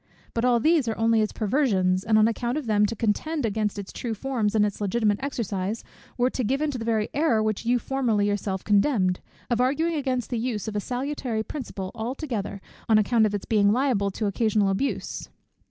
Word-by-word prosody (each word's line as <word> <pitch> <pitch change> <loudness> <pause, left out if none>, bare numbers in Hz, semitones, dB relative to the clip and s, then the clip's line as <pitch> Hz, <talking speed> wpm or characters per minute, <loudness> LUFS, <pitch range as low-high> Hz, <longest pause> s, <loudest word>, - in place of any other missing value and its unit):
But 230 - -1
all 245 -1 +4
these 310 0 +3
are 220 - -1
only 225 0 +3
its 215 - 0
perversions; 195 -6 +1
and 220 0 +3
on 215 0 +6
account 240 +3 -1
of 305 - -3
them 210 -2 +3
to 230 - -4
contend 245 +7 -1
against 210 -1 -1
its 200 -1 -7
true 230 -2 -3
forms, 225 -3 -1
and 210 -1 +4
its 205 0 -4
legitimate 210 0 +1
exercise, 220 -6 -3 0.3
were 250 +1 +2
to 255 - -2
give 260 +5 0
into 295 -4 -1
the 225 - -4
very 220 -2 0
error 260 -8 +2
which 215 +1 -2
you 245 +1 +4
formerly 235 -5 0
yourself 200 -2 -2
condemned, 200 -3 +2 0.3
of 240 0 +2
arguing 315 +6 +1
against 260 -5 -2
the 240 - 0
use 225 -3 -2
of 215 - -4
a - - +1
salutary 250 -1 -2
principle 210 -9 -6
altogether, 230 -4 -4 0.3
on 220 - +6
account 220 +1 +3
of 205 - -2
its 200 - -4
being 205 -2 +3
liable 235 -5 +1
to 210 +3 -3
occasional 210 0 +2
abuse. 230 +9 -2
225 Hz, 200 wpm, -25 LUFS, 205-255 Hz, 0.3 s, on